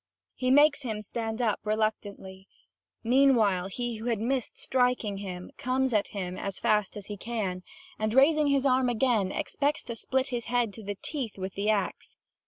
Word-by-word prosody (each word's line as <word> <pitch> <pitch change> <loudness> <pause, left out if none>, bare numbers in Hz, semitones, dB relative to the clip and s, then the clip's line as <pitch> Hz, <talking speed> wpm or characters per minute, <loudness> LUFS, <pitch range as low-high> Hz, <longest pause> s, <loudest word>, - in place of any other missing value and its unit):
He 255 - -1
makes 285 +1 +5
him 220 -5 -4
stand 225 +2 -3
up 215 -3 +1
reluctantly. 205 -3 -3 0.6
Meanwhile, 230 -7 +4
he 240 +3 -4
who 220 - -8
had 235 -2 +1
missed 250 +2 -2
striking 250 -5 +1
him 180 -2 -7
comes 255 0 0
at 210 -2 +2
him 185 -2 -5
as 195 -2 -4
fast 210 -1 +1
as 205 - -8
he 205 0 -6
can 195 -4 -3 0.4
and, 215 0 0
raising 295 +4 +5
his 280 -1 +2
arm 255 -1 +3
again, 230 -5 +1
expects 290 +8 -1
to 235 - -6
split 265 +3 -1
his 240 -3 -3
head 240 -3 0
to 220 - -10
the 205 0 -4
teeth 265 -10 -4
with 190 0 -5
the 205 +2 -1
axe. 205 -3 -1
225 Hz, 180 wpm, -28 LUFS, 200-255 Hz, 0.6 s, makes